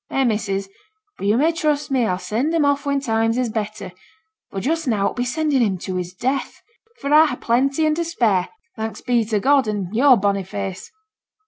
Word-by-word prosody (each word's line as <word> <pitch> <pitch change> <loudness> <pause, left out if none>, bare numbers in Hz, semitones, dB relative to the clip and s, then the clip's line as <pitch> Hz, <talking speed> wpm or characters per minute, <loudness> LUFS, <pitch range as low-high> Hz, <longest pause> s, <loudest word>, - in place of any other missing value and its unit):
Eh, 270 - +1
missus, 210 -4 -1 0.5
but 200 - -2
yo' 210 +3 +3
may 310 +5 +3
trust 300 -3 -1
me 250 -4 +2
a'll 180 - 0
send 220 - -1
him 310 -3 +3
off 285 0 +1
when 280 0 +1
times 225 -2 0
is 250 -2 0
better; 215 -3 -4 0.6
but 195 - -5
just 320 +4 -1
now 210 -5 +1
it - - +3
would - - -10
be 245 - 0
sendin' 285 +1 0
him 200 -5 +1
to 185 +1 -5
his 180 -1 -4
death; 260 +9 -3 0.3
for 280 -9 -4
a 310 +1 +7
ha' 250 - -4
plenty 275 +6 +1
and 310 0 +2
to 340 - 0
spare, 230 - +1 0.3
thanks 220 0 -5
be 240 -2 +1
to 215 -1 -1
God 270 +1 +3
an' 205 -3 -3
yo'r 255 +2 +5
bonny 200 -1 +1
face.' 195 -1 -6
235 Hz, 215 wpm, -21 LUFS, 205-280 Hz, 0.6 s, a